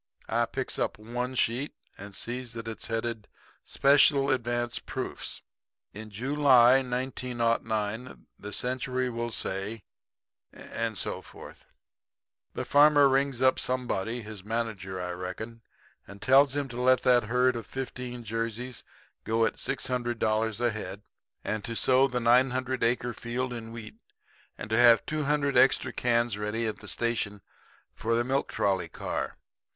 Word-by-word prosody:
"I -, -, +1 dB
picks -, -, -3 dB
up -, -, -1 dB
one 125 Hz, +4 st, -4 dB
sheet 125 Hz, +4 st, 0 dB, 0.2 s
and 100 Hz, 0 st, -10 dB
sees 125 Hz, 0 st, -4 dB
that 115 Hz, -1 st, -7 dB
it's 115 Hz, -, -5 dB
headed: 115 Hz, -1 st, -3 dB, 0.4 s
'Special 140 Hz, 0 st, +4 dB
Advance 120 Hz, -1 st, -1 dB
Proofs. -, -, -5 dB, 0.5 s
In 110 Hz, +1 st, -8 dB
July, 130 Hz, +2 st, +5 dB
1909, 120 Hz, -3 st, -2 dB
the 105 Hz, -, -9 dB
Century 130 Hz, +1 st, -1 dB
will 120 Hz, 0 st, -3 dB
say' 100 Hz, 0 st, -3 dB, 0.7 s
and 115 Hz, -2 st, -4 dB
so -, -, -2 dB
forth. -, -, -13 dB, 0.9 s
"The -, -, -3 dB
farmer 145 Hz, 0 st, +6 dB
rings 135 Hz, -1 st, +1 dB
up 130 Hz, -, +4 dB
somebody 120 Hz, -2 st, -2 dB
his 105 Hz, -3 st, -9 dB
manager, 105 Hz, -4 st, -3 dB
I 90 Hz, 0 st, -3 dB
reckon 95 Hz, +6 st, -6 dB, 0.5 s
and 100 Hz, 0 st, -11 dB
tells 135 Hz, +4 st, +5 dB
him 145 Hz, -1 st, -1 dB
to 120 Hz, 0 st, -5 dB
let 130 Hz, 0 st, +4 dB
that 125 Hz, -3 st, +4 dB
herd 125 Hz, +2 st, +2 dB
of 115 Hz, -3 st, -6 dB
15 125 Hz, -2 st, -6 dB
Jerseys 115 Hz, +2 st, -3 dB, 0.4 s
go 115 Hz, 0 st, +2 dB
at -, -, -2 dB
$600 115 Hz, -4 st, -1 dB
a 120 Hz, -1 st, +2 dB
head; 105 Hz, -1 st, -6 dB, 0.4 s
and 110 Hz, 0 st, -2 dB
to 115 Hz, -, -4 dB
sow 130 Hz, +5 st, +4 dB
the 125 Hz, -2 st, -2 dB
900 130 Hz, +1 st, +2 dB
acre 120 Hz, +1 st, +1 dB
field 125 Hz, +2 st, -3 dB
in 115 Hz, -1 st, -7 dB
wheat; 115 Hz, -2 st, -9 dB, 0.6 s
and -, -, -6 dB
to 110 Hz, -, +3 dB
have 120 Hz, -1 st, +7 dB
200 150 Hz, -2 st, 0 dB
extra 130 Hz, 0 st, +4 dB
cans 120 Hz, -3 st, +1 dB
ready 105 Hz, +2 st, -1 dB
at 110 Hz, -, -3 dB
the 105 Hz, -, -10 dB
station 105 Hz, -3 st, -1 dB, 0.5 s
for 115 Hz, +1 st, -1 dB
the 120 Hz, -, +2 dB
milk 135 Hz, +3 st, -1 dB
trolley 95 Hz, -4 st, 0 dB
car. -, -, -4 dB
120 Hz, 145 wpm, -28 LUFS, 110-130 Hz, 0.9 s, have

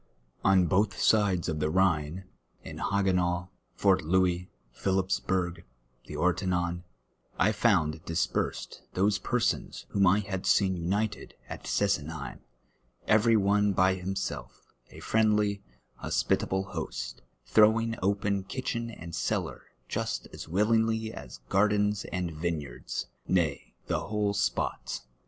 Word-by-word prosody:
On 95 Hz, -2 st, +5 dB
botli 100 Hz, +2 st, +2 dB
sides 100 Hz, -5 st, +3 dB
of 75 Hz, -, -2 dB
the 75 Hz, 0 st, 0 dB
llliine, 90 Hz, -1 st, +1 dB, 0.4 s
in -, -, -8 dB
Ilaj^enau, 90 Hz, -3 st, +1 dB, 0.3 s
Fort 95 Hz, +1 st, +3 dB
Louis, 90 Hz, +1 st, +1 dB, 0.3 s
Phillpps 95 Hz, 0 st, +1 dB
burg, 90 Hz, -2 st, -1 dB, 0.4 s
the -, -, -7 dB
Orteniin, 90 Hz, -1 st, 0 dB, 0.6 s
I 100 Hz, -, +4 dB
found 85 Hz, -8 st, +2 dB
dispersed 85 Hz, +1 st, -2 dB
those 100 Hz, +2 st, +2 dB
persons 120 Hz, -1 st, -1 dB
wliom 100 Hz, -2 st, +4 dB
I 100 Hz, -, +3 dB
had 100 Hz, -2 st, -4 dB
seen 95 Hz, -2 st, +3 dB
united 100 Hz, +5 st, -2 dB
at -, -, -8 dB
Scsenheim, 80 Hz, -7 st, -1 dB, 0.7 s
every 110 Hz, +1 st, +5 dB
one 100 Hz, 0 st, +3 dB
by 95 Hz, +1 st, +4 dB
himself, 95 Hz, +1 st, -5 dB, 0.2 s
a -, -, -12 dB
friendly, 105 Hz, -2 st, +2 dB, 0.4 s
h()sj)itable 95 Hz, +10 st, 0 dB
host, -, -, -5 dB, 0.3 s
t]n 110 Hz, -, +8 dB
o\vinf; 115 Hz, +1 st, -1 dB
oj^en 100 Hz, 0 st, 0 dB
Idtehen 115 Hz, -3 st, -3 dB
and 85 Hz, 0 st, -8 dB
cellar -, -, -2 dB, 0.2 s
just -, -, -3 dB
as -, -, -8 dB
"wil 100 Hz, +7 st, +1 dB
linu:ly 110 Hz, -1 st, +2 dB
as 65 Hz, -3 st, -10 dB
gjuxlens 105 Hz, 0 st, +2 dB
and 90 Hz, -1 st, -2 dB
vineyards, 75 Hz, -6 st, -4 dB, 0.2 s
nay, 80 Hz, -6 st, 0 dB
the -, -, 0 dB
whole 105 Hz, -1 st, -1 dB
spot. 100 Hz, 0 st, -1 dB
95 Hz, 125 wpm, -29 LUFS, 85-105 Hz, 0.7 s, t]n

